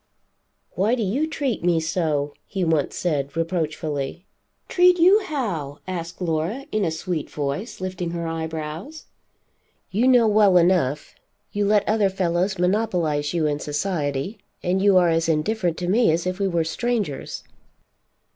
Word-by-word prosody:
"Why 210 +6 +1
do 235 - -2
you 255 +11 0
treat 275 - -2
me 170 -2 +3
so?" 160 -3 -1
he 190 -2 -2
once 160 -4 +1
said, 145 -4 -2
reproachfully. 160 -2 -2 0.4
"Treat 360 0 +5
you 370 +5 +6
how?" 185 - -3
asked 170 -2 -5
Laura 175 - -2
in 215 -1 0
a 170 - +1
sweet 160 0 -3
voice, 145 +9 -4
lifting 185 -2 -3
her 170 0 -4
eyebrows. 160 - -5 0.9
"You 225 +6 +2
know 245 -3 +6
well 205 -3 +5
enough. 170 -5 +2 0.4
You 205 0 0
let 210 -1 +3
other 210 -2 +3
fellows 185 +1 0
monopolize 175 -6 0
you 165 -2 +1
in 145 -1 0
society, 150 +3 -2 0.2
and 185 +2 +1
you 200 -1 +5
are 175 -1 +5
as 165 0 +1
indifferent 175 +2 0
to 175 - -3
me 220 +1 +4
as 165 +2 0
if 185 +1 -2
we 200 - +1
were 170 -3 +1
strangers." 205 - -2
175 Hz, 150 wpm, -23 LUFS, 160-205 Hz, 0.9 s, you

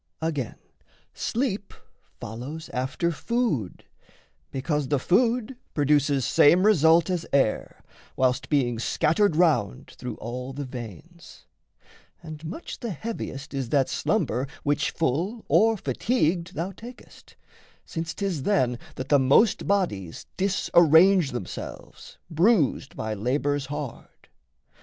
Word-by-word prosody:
Again, 150 -8 -3 0.6
sleep 215 -5 -2 0.4
follows 135 +9 -7
after 135 +7 -1
food, 165 - -2 0.7
because 145 +1 -2
The 145 - +1
food 235 - +1 0.2
produces 145 -2 +2
same 175 +9 +5
result 165 -5 +5
as 175 -2 -1
air, 135 -6 0 0.3
Whilst 130 -1 +1
being 125 -6 +1
scattered 165 - +2
round 155 - +1
through 125 -3 -7
all 125 +3 -6
the 140 +1 -5
veins; 120 - -10 0.8
And 155 -1 -9
much 185 - -7
the 235 - -4
heaviest 175 -8 -6
is 135 -4 -3
that 135 -1 +2
slumber 140 - 0 0.2
which, 145 +1 +1
Full 170 - -2
or 225 +1 +4
fatigued, 170 - -1
thou 170 +5 -3
takest; 235 +6 -14 0.5
since 165 -1 -5
'tis 195 -7 -2
then 130 - +1 0.2
That 130 +1 -6
the 145 - +5
most 140 - +3
bodies 135 - -1
disarrange 180 -2 +4
themselves, 120 -7 -8
Bruised 170 - +2
by 110 0 -3
labours 140 +6 -1
hard. 145 -3 -8
150 Hz, 115 wpm, -25 LUFS, 130-185 Hz, 0.8 s, same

